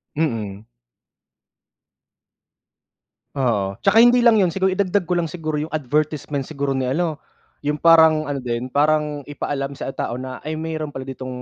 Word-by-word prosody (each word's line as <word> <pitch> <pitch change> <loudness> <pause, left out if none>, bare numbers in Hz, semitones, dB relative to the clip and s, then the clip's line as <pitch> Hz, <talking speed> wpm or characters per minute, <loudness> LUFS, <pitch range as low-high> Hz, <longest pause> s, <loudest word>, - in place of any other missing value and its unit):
Mm. 110 -9 -2 2.7
Oo. 105 -8 0
Tsaka 200 +3 +5
hindi 240 +1 +6
lang 230 -2 +6
yun. 190 - +4
Siguro 190 0 +1
idagdag 195 0 +1
ko 175 0 0
lang 165 - -1
siguro 155 -2 -3
yung 155 +2 -5
advertisement 150 -1 -1
siguro 140 -3 -2
ni 130 -1 -1
ano, 155 +3 -1 0.5
yung 150 +1 +1
parang 160 -2 +6
ano 140 -1 -2
din, 125 0 -3
parang 150 0 +1
ipaalam 140 -1 -3
sa - - -5
tao 120 - -4
na, 130 0 -6
ay, 155 +1 -3
meron 155 -2 -4
pala 135 - -5
ditong 130 -1 -7
150 Hz, 150 wpm, -21 LUFS, 130-160 Hz, 2.7 s, hindi